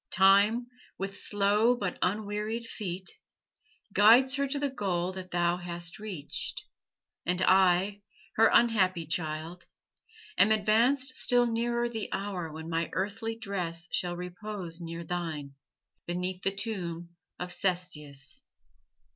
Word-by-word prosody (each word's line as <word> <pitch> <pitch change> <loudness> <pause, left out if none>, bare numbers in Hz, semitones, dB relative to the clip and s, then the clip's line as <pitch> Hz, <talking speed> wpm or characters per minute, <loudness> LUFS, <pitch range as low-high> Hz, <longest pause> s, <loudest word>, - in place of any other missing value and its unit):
Time, 200 +5 +5 0.3
with 195 +1 -4
slow, 205 +4 +3
but 200 -5 -3
unwearied 210 +3 -1
feet, 190 -4 -5 0.9
guides 235 +6 +7
her 280 +1 0
to 280 +2 -2
the 285 -1 -1
goal 185 -7 -1
that 185 -1 -7
thou 175 0 +1
hast 175 0 -5
reached; 190 -9 -5 0.6
and 180 +1 0
I, 190 +2 +4 0.3
her 225 +1 +6
unhappy 190 -7 +3
child, 160 +2 -4 0.7
am 215 - +6
advanced 235 +6 +3
still 245 0 +3
nearer 235 +1 0
the 225 -3 -5
hour 190 -4 -3
when 160 +1 -7
my 165 0 -1
earthly 210 +5 -2
dress 180 -6 -3
shall 175 -1 -1
repose 180 -1 -5
near 170 0 -5
thine, 160 -5 -4 0.5
beneath 180 +1 -2
the 195 +1 -1
tomb 175 -5 -4 0.3
of 180 0 -4
Cestius. 150 -8 -3
190 Hz, 120 wpm, -29 LUFS, 175-215 Hz, 0.9 s, guides